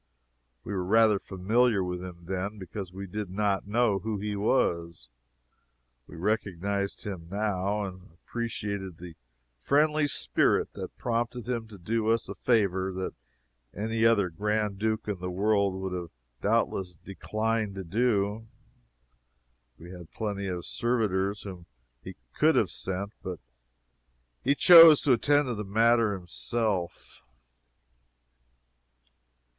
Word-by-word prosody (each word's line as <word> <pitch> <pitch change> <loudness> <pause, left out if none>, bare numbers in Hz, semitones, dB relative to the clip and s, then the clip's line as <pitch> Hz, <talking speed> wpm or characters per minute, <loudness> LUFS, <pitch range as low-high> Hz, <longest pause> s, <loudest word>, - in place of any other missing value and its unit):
We 105 - -5
were 95 -2 -1
rather 110 +1 +4
familiar 105 +3 +1
with 90 0 -4
him 85 -2 -10
then, 95 +3 -3
because 95 0 -7
we 95 +2 -7
did 105 +1 -5
not 100 0 -1
know 110 -2 +2
who 110 +2 -3
he 105 +1 -3
was. 85 - 0 1.0
We - - -12
recognized 100 +1 -2
him 95 -5 -6
now, 100 0 -1
and 95 -1 -8
appreciated 100 -1 -5
the 85 -1 -10 0.5
friendly 150 - +2
spirit - - +2
that - - -8
prompted 120 0 -2
him 120 -3 -3
to 105 -2 -12
do 110 +5 -1
us 115 0 +1
a - - -5
favor 95 -5 +1
that 95 0 -4 0.6
any 110 +2 -1
other 105 -6 +4
Grand 105 +2 -1
Duke 110 0 -1
in 100 -3 -3
the 90 0 -4
world 100 +1 +1
would 95 -1 -4
have 90 -2 -5 0.3
doubtless 90 -2 0
declined 110 +3 -3
to 95 - -5
do. 105 +2 0 1.3
He 85 +2 -12
had 90 -3 -11
plenty 100 -3 -4
of 90 -2 -4
servitors 105 -4 -1
whom 90 -4 -9 0.3
he - - -9 0.2
could - - +3
have - - +2
sent, 95 +2 -4
but 90 -2 -6 1.0
he 140 +2 +3
chose 165 -2 +9
to 135 - +4
attend 145 +5 +3
to 125 - -1
the 105 -1 -4
matter 115 +2 +3
himself. 95 +1 -3
100 Hz, 130 wpm, -28 LUFS, 95-110 Hz, 1.3 s, chose